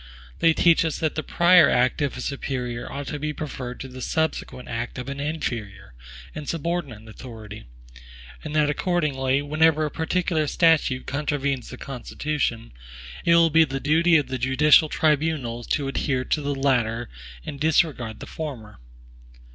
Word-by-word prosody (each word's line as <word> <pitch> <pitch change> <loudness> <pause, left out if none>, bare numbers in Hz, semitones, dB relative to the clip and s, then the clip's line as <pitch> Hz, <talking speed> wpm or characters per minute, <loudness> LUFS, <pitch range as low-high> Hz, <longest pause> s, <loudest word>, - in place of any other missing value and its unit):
They 165 -1 +4
teach 170 -2 +4
us 160 -3 -2
that 155 -2 -1
the 155 - -2
prior 175 0 +5
act 125 +4 +2
of 140 -3 -1
a - - -5
superior 125 -3 -4
ought 140 +1 -5
to 150 - -4
be 150 +1 -3
preferred 130 -5 -6
to 135 - -6
the 130 0 -10
subsequent 160 -4 -2
act 115 0 -4
of 125 +1 -5
an 140 0 -5
inferior 115 - -4 0.4
and 150 -2 -6
subordinate 160 -9 -3
authority; 110 - -10 0.8
and 150 - -5
that 150 -1 +3
accordingly, 145 -4 0
whenever 155 +1 +2
a 150 - -3
particular 160 -1 0
statute 160 -6 +2
contravenes 140 -3 -2
the 130 - -8
Constitution, 130 -2 -3 0.5
it 170 - +5
will 165 -1 +5
be 165 +1 +6
the 135 -3 -3
duty 165 +4 +4
of 145 - 0
the 130 - -4
judicial 150 +5 +4
tribunals 150 -7 0
to 140 - -1
adhere 135 -1 -1
to 150 - 0
the 145 0 -2
latter 120 -4 0 0.4
and 140 - -6
disregard 145 -7 +1
the - - -6
former. 125 - -7
140 Hz, 160 wpm, -24 LUFS, 125-155 Hz, 0.8 s, be